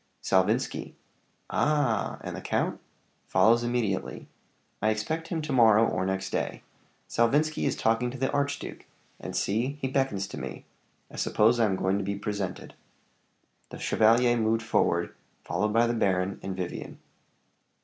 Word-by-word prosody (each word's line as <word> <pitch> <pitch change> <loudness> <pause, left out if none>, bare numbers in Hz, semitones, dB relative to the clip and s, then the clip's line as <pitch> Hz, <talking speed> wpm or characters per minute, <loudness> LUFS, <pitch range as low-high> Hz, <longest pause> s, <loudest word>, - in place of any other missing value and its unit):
"Salvinski." 100 +7 +1 0.6
"Ah! 145 -8 +1
And - - -6
the - - -6
count?" - - -1 0.5
"Follows 115 +2 +4
immediately. 120 -5 -2 0.5
I 110 - +3
expect 155 +10 -2
him 165 -3 -3
to 150 -2 -3
morrow 115 -3 +6
or 95 +1 -1
next 95 0 -2
day. - - -3 0.4
Salvinski 145 +7 +1
is 135 - 0
talking 115 +2 +1
to 130 - -7
the 130 +1 0
archduke; 140 0 -3 0.3
and - - -7
see, 120 +8 0
he 135 - -1
beckons 130 -8 0
to - - -7
me. - - -7 0.5
I - - -10
suppose 115 +3 +3
I 115 - +5
am 95 -3 +1
going 95 +2 0
to - - -2
be 100 +1 -2
presented." 100 -2 -4 1.0
The - - -8
chevalier 120 +2 +3
moved 115 0 +1
forward, 85 -6 +1 0.3
followed 105 +6 -1
by 115 +2 +4
the 120 - 0
baron 95 -3 0
and 95 -1 -5
Vivian. 90 -2 -5
115 Hz, 150 wpm, -28 LUFS, 100-125 Hz, 1.0 s, morrow